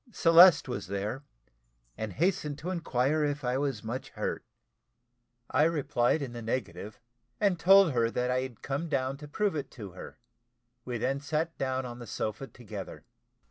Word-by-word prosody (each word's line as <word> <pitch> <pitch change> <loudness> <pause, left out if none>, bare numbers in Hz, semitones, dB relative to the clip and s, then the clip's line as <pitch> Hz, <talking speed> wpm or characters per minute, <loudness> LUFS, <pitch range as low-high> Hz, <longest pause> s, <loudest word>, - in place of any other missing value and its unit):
Celeste 170 -4 +7
was 125 - -4
there, 100 +7 -3 0.7
and 110 -3 -5
hastened 155 - 0
to 170 +5 -4
inquire 150 -3 0
if 145 -1 -1
I 125 +1 0
was 135 -6 -2
much 130 +4 -5
hurt. - - -4 1.1
I 130 - +3
replied 145 -3 +2
in 125 -3 -6
the 120 - -6
negative, 105 -4 -4 0.4
and 195 -4 +2
told 195 0 +7
her 115 -3 +2
that 125 +1 -1
I 130 0 +1
had 130 -4 -8
come 145 +5 -3
down 135 -1 -1
to 150 +1 -10
prove 200 +5 0
it 140 -3 -4
to 100 -5 -7
her; 90 - -10 0.7
we 125 -1 -3
then 135 +4 -1
sat 155 +3 -2
down 130 -1 -1
on 120 0 -7
the 120 - -9
sofa 110 +6 -4
together. 105 -7 -9
135 Hz, 170 wpm, -29 LUFS, 120-155 Hz, 1.1 s, Celeste